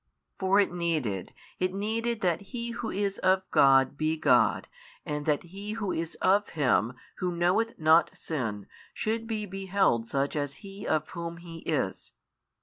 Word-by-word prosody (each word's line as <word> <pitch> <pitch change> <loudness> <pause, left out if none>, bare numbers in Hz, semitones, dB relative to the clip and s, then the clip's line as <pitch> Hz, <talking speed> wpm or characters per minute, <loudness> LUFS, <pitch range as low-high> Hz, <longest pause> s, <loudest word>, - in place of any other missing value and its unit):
For 190 +1 +3
it 200 -3 +2
needed, 155 - -1 0.3
it 185 +1 0
needed 225 +3 -1
that 175 -1 +1
He 235 +4 -5
Who 235 -1 -4
is 200 0 -1
of 190 0 +3
God 135 0 +5
be 155 +1 +1
God - - +3 0.4
and 150 -2 -3
that 150 -2 +2
He 200 +4 -7
Who 210 -4 -2
is 165 0 -3
of 200 +2 +2
Him 125 -5 +2 0.2
Who 180 -2 -2
knoweth 190 +7 +1
not 160 +1 +5
sin 110 -10 -3 0.3
should 225 +1 -2
be 215 -2 -2
beheld 190 - +1
such 140 +4 -1
as 145 -1 -2
He 195 +1 -8
of 155 -1 0
Whom 170 -1 -5
He 170 -1 -10
is. 140 - -2
175 Hz, 160 wpm, -28 LUFS, 150-200 Hz, 0.4 s, God